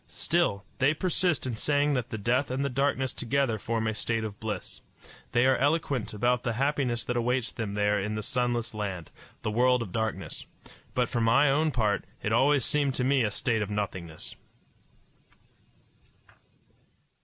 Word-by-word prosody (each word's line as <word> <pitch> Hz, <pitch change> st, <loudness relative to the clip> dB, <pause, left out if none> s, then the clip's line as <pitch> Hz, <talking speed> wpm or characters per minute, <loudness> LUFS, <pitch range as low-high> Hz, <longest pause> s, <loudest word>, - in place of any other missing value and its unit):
Still, 155 Hz, -13 st, 0 dB
they 145 Hz, +4 st, +3 dB
persist 175 Hz, -3 st, +1 dB
in 125 Hz, -3 st, -2 dB
saying 145 Hz, +4 st, +2 dB
that 125 Hz, -3 st, -1 dB
the 110 Hz, -, -4 dB
death 125 Hz, +6 st, +1 dB
and 130 Hz, +2 st, -1 dB
the -, -, 0 dB
darkness 135 Hz, -1 st, 0 dB
together 125 Hz, -2 st, 0 dB
form 115 Hz, +1 st, -1 dB
a 110 Hz, -, 0 dB
state 115 Hz, +1 st, -1 dB
of 105 Hz, -2 st, -6 dB
bliss. 105 Hz, -4 st, -5 dB, 0.5 s
They 120 Hz, +1 st, +3 dB
are 130 Hz, 0 st, +5 dB
eloquent 140 Hz, -5 st, 0 dB
about 120 Hz, +4 st, +1 dB
the 120 Hz, -, -1 dB
happiness 130 Hz, -2 st, 0 dB
that 125 Hz, -, -2 dB
awaits 125 Hz, +1 st, 0 dB
them 105 Hz, -4 st, -4 dB
there 105 Hz, 0 st, +2 dB
in 105 Hz, +2 st, -2 dB
the 110 Hz, -, -3 dB
sunless 120 Hz, -2 st, -1 dB
land 95 Hz, -6 st, -4 dB, 0.3 s
the 110 Hz, -, -1 dB
world 125 Hz, +2 st, +3 dB
of 95 Hz, -, -9 dB
darkness; 110 Hz, +1 st, -3 dB, 0.5 s
but 125 Hz, -1 st, +2 dB
for 120 Hz, -, -1 dB
my 120 Hz, +5 st, +4 dB
own 155 Hz, +3 st, +2 dB
part, 110 Hz, -7 st, +1 dB, 0.2 s
it 105 Hz, -, 0 dB
always 135 Hz, +2 st, +4 dB
seemed 140 Hz, -3 st, +1 dB
to 125 Hz, -, 0 dB
me 135 Hz, -1 st, +3 dB
a 110 Hz, -, +1 dB
state 110 Hz, +1 st, 0 dB
of 105 Hz, -, -2 dB
nothingness. 95 Hz, -6 st, -4 dB
120 Hz, 170 wpm, -28 LUFS, 110-135 Hz, 0.5 s, are